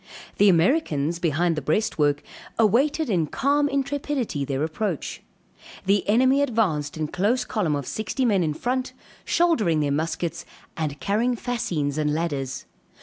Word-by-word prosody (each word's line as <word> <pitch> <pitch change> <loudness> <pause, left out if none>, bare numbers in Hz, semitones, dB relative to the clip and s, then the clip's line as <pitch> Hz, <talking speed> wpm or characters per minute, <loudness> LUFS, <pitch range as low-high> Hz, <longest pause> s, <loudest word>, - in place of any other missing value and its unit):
The 205 - +7
Americans, 170 - +2
behind 170 +1 +1
the 155 - -3
breastwork, 150 -3 +1 0.3
awaited 275 +8 +3
in 175 -7 +1
calm 285 - +1
intrepidity 275 - -2
their 135 +1 -2
approach. 165 +1 -3 0.6
The 200 +1 +2
enemy 260 +5 +4
advanced 190 - 0
in 155 -1 -1
close 215 +10 0
column 175 -9 0
of 140 -2 -3
sixty 220 - -2
men 205 -6 +3
in 155 -3 0
front, 255 +5 -2 0.3
shouldering 235 - +2
their 145 -1 0
muskets 165 +2 -2 0.3
and 150 -3 -3
carrying 230 +5 +1
fascines 170 - -2
and 150 -1 +1
ladders. 140 -5 -3
185 Hz, 140 wpm, -24 LUFS, 150-245 Hz, 0.6 s, The